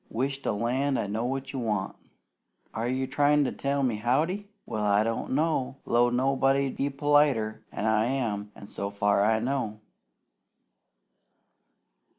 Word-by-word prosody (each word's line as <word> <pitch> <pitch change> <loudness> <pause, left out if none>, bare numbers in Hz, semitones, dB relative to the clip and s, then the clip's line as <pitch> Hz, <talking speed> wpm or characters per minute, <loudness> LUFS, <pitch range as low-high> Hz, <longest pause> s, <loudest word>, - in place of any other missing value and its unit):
Wish 135 +4 -2
to - - -1
land 130 +6 0
I - - -1
knowed 110 +4 -2
what 135 +1 -4
you 135 - -3
want! 105 -5 -2 0.8
Are 115 +2 -2
you 130 +1 0
tryin' 145 +2 +3
to - - -1
tell 140 0 -1
me 115 -5 0
`Howdy'? 160 - 0 0.2
Well, 110 -1 -3
I 105 0 +3
don't 115 +3 -2
'low 130 -5 +1
nobody 135 +2 +2
to - - -11
be 140 - 0
politer 140 -6 +2
'an 105 - -4
I 110 0 +3
am, 110 -6 -2
so 100 0 -5
far 100 0 +2
as 110 +1 +3
I 115 - -3
know." 125 -6 -2
125 Hz, 155 wpm, -27 LUFS, 110-140 Hz, 0.8 s, tryin